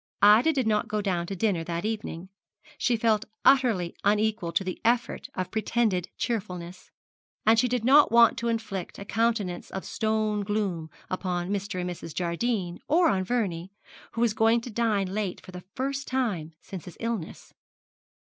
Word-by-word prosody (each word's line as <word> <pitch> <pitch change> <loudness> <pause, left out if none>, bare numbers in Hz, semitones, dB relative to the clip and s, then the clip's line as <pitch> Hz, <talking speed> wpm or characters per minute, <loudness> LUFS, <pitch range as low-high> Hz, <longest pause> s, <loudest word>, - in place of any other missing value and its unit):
Ida 215 +9 +7
did 265 -5 0
not 215 +1 +1
go 215 0 -1
down 180 -4 -1
to 195 - -4
dinner 190 -4 0
that 170 +2 -3
evening. 205 -5 -4 0.5
She 245 -3 +2
felt 220 -1 +2 0.2
utterly 230 -11 +4
unequal 210 -3 +1
to - - +1
the 185 -1 -5
effort 235 +1 0
of 185 -1 -3
pretended 220 -4 0
cheerfulness, 185 -6 -4 0.6
and 220 +1 +5
she 250 - +3
did 245 -2 -1
not 285 +4 +6
want 235 -1 +6
to 235 - -2
inflict 220 -6 -3
a 200 - -8
countenance 220 -5 -1
of 190 - -6
stony 215 -1 0
gloom 195 -6 -2 0.2
upon 180 -1 -2
Mr. 200 -2 -2
and 180 - -2
Mrs. 170 -3 -7
Jardine, 180 +1 -1
or 340 +3 +4
on 190 -2 +1
Vernie, 190 -5 -2 0.4
who 230 - -2
was 235 -3 +3
going 225 +2 +3
to 245 - -8
dine 215 -3 +1
late 205 -3 -2
for - - -13
the 180 0 -9
first 275 +1 -2
time 205 -12 -1
since 190 -4 -9
his 180 - -11
illness. 230 -7 -5
210 Hz, 170 wpm, -27 LUFS, 180-230 Hz, 0.6 s, Ida